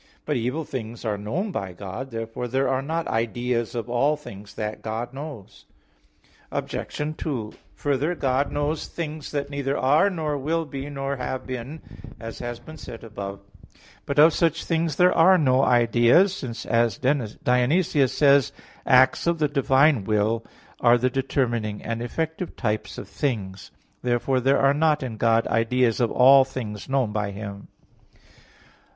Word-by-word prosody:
But 150 - -1
evil 125 +6 -1
things 120 -5 -6
are 105 -2 0
known 150 - -3
by 95 - -4
God. 100 +8 -7
Therefore 115 +1 -5
there 135 +3 0
are 130 0 0
not 160 +4 -3
ideas 120 +1 -1
of 115 -1 -3
all 130 +5 +2
things 100 -8 -11
that 105 0 -4
God 115 +3 -4
knows. 140 -7 -9 0.9
Obj. 150 +1 -4
2: 120 -9 -4 0.2
Further, 145 +4 0
God 135 -1 0
knows 145 +2 -2
things 155 -3 -6
that 145 -1 -3
neither 140 -1 -2
are, 150 +9 +4
nor 155 -6 -2
will 160 +4 -1
be, 140 0 -6
nor 140 -1 -3
have 130 0 -4
been, 130 +5 -6 0.4
as 115 -1 -8
has 120 -1 -5
been 155 0 -12
said 115 -6 -9
above 100 -3 -7
(A. 100 -3 -25
9). - - -25 0.2
But 140 - -2
of 155 +2 +7
such 165 -3 +1
things 165 -2 0
there 180 +2 +4
are 185 +3 +6
no 130 -5 +3
ideas, 120 +11 +4
since, 120 -5 -6
as 115 0 +1
Dionysius 130 - +1
says 140 -4 +4
(Div. - - -28
Nom. - - -20
v): - - -24
"Acts 130 +5 +5
of 170 0 +2
the 155 -1 +2
divine 140 -2 +3
will 110 +2 0 0.4
are 120 0 +5
the 125 +1 0
determining 120 -5 -1
and 115 0 -3
effective 160 +7 -3
types 105 -3 -3
of - - -7
things." 100 -8 -3 0.3
Therefore 125 +2 +1
there 135 +2 +3
are 135 0 +4
not 150 -1 +2
in 115 -4 -5
God 115 +1 +3
ideas 115 0 +1
of 120 -2 +2
all 135 +2 +7
things 115 -5 -6
known 130 -5 +1
by 105 -1 -1
Him. 100 0 -8
130 Hz, 170 wpm, -24 LUFS, 115-145 Hz, 0.9 s, of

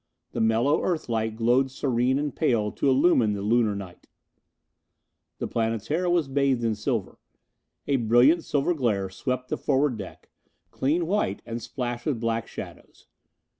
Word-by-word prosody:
The - - -2
mellow 115 +7 +2
Earth 165 -8 -2
light 110 -1 -1
glowed 120 +4 +2
serene 130 -1 0
and 145 -1 -2
pale 105 -3 +1
to 140 - 0
illumine 130 -5 +4
the 100 -1 -4
Lunar 110 -1 +2
night. 95 -3 -9 1.3
The - - -3
Planetara 115 - -1
was 175 -4 +2
bathed 135 -3 +1
in 115 -1 +1
silver. 110 -2 -3 0.7
A 140 - +2
brilliant 120 +8 +4
silver 145 +4 0
glare 105 - -1
swept 125 +4 -3
the - - -1
forward 140 -3 +1
deck, 95 - -10 0.4
clean 160 +6 0
white 175 - -1
and 115 +1 -5
splashed 120 -1 -4
with 135 -6 0
black 115 0 -1
shadows. - - -10
120 Hz, 150 wpm, -26 LUFS, 110-140 Hz, 1.3 s, illumine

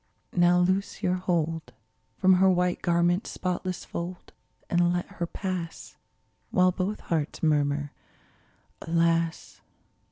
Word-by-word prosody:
Now 175 0 +4
loose 185 +2 0
your 180 - +2
hold 165 -6 -1 0.4
From 190 0 +5
her 190 - +6
white 180 -1 +1
garment's 175 +2 +1
spotless 185 0 -3
fold, 175 +1 -6 0.3
And 175 0 +2
let 175 0 -1
her 170 - -5
pass 180 -3 -5 0.3
— 110 0 -44
While 185 0 +4
both 190 +3 -3
hearts 160 -2 -2
murmur, 145 -2 +1 0.9
''Alas 165 0 0
175 Hz, 120 wpm, -27 LUFS, 165-185 Hz, 0.9 s, her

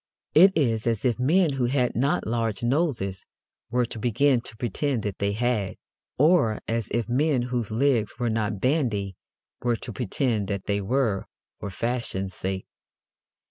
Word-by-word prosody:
It 190 +4 +7
is 115 -7 +1
as 115 -1 0
if 125 -1 +1
men 160 +4 +3
who 125 - +1
had 125 0 +1
not 135 +5 +1
large 115 -1 -1
noses 120 - 0 0.5
were 125 +1 +1
to 115 - -7
begin 125 +3 +2
to 115 - -10
pretend 120 +1 -1
that 100 -2 -4
they 100 0 0
had, 110 -3 0 0.4
or 145 - +4
as 115 -1 -1
if 115 -1 -1
men 135 +1 +2
whose 120 -3 -2
legs 115 -1 +1
were 120 -1 -1
not 105 -2 -1
bandy 115 - 0 0.5
were 120 -1 +1
to 115 - -7
pretend 115 -1 -1
that 100 -1 -3
they 100 -1 0
were, 110 -2 0 0.3
for 100 - -5
fashion's 100 -3 -3
sake. 95 0 -4
120 Hz, 160 wpm, -26 LUFS, 105-130 Hz, 0.5 s, It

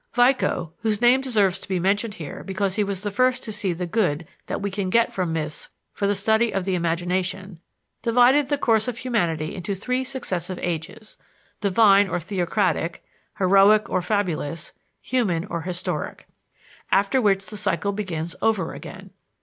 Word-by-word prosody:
Vico 245 - +2
whose 215 -2 0
name 245 +2 +5
deserves 205 -8 +1
to - - -10
be 190 -2 -1
mentioned 205 +4 0
here 155 -4 -7
because 195 0 -1
he 210 - +1
was 200 -1 -3
the 205 - -2
first 255 +4 +2
to 220 - -5
see 200 -2 -1
the 175 +1 -3
good 175 -5 0 0.2
that - - -3
we 200 0 -3
can 195 -1 -2
get 230 +4 +3
from 180 -3 -1
myths 155 -1 -3 0.2
for 200 - -1
the 205 - +2
study 220 +3 +2
of 195 -2 -2
the 190 - 0
imagination 180 +2 -2 0.4
divided 250 +4 +4
the 290 - +1
course 225 -4 +2
of 245 -2 -3
humanity 175 -12 -1
into 195 +2 -4
three 250 +7 -1
successive 190 -9 -4
ages: 175 +6 -5 0.4
divine 200 0 +5
or 175 - -1
theocratic, 180 -1 -1 0.3
heroic 200 +2 +5
or 185 - +1
fabulous, 175 -5 -2 0.3
human 195 -10 0
or 170 -4 -4
historic, 180 +1 -4 0.7
after 200 +7 +3
which 195 -3 +2
the 215 - -10
cycle 200 0 -1
begins 175 -5 -4
over 210 -7 +1
again. - - -10
195 Hz, 165 wpm, -24 LUFS, 180-220 Hz, 0.7 s, name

